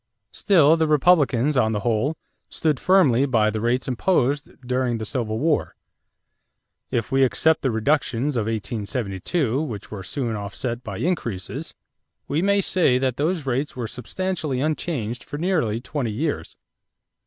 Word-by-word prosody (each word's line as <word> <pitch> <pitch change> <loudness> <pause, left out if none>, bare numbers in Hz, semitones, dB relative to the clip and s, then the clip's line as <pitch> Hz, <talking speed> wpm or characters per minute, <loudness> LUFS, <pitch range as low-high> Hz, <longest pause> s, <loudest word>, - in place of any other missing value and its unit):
Still 165 -6 +4
the 160 -1 +2
Republicans 150 -3 +3
on 110 -3 +2
the 105 - -1
whole 120 +8 0 0.3
stood 155 -5 0
firmly 140 -9 +4
by 110 -4 +2
the 110 0 -3
rates 120 +2 0
imposed 140 +1 +1 0.2
during 125 -1 0
the 110 - -5
Civil 110 -1 -2
War. 155 +4 0 1.1
If 115 -2 -2
we 135 0 +4
except 160 +5 +3
the 135 - +1
reductions 130 +3 0
of 110 -3 0
1872 115 - -2
which 115 -11 -6
were 105 -3 -6
soon 115 +4 -3
offset 115 +4 -4
by 100 -4 -6
increases, 120 - -3 0.5
we 150 +3 0
may 200 +1 +3
say 170 -9 +2
that 130 -1 -1
those 160 +1 0
rates 135 +3 -1
were 125 -2 -3
substantially 150 - -3
unchanged 130 -6 -2
for 145 - -7
nearly 155 - 0
twenty 125 -2 -3
years. 145 +8 -3
130 Hz, 145 wpm, -23 LUFS, 115-155 Hz, 1.1 s, Still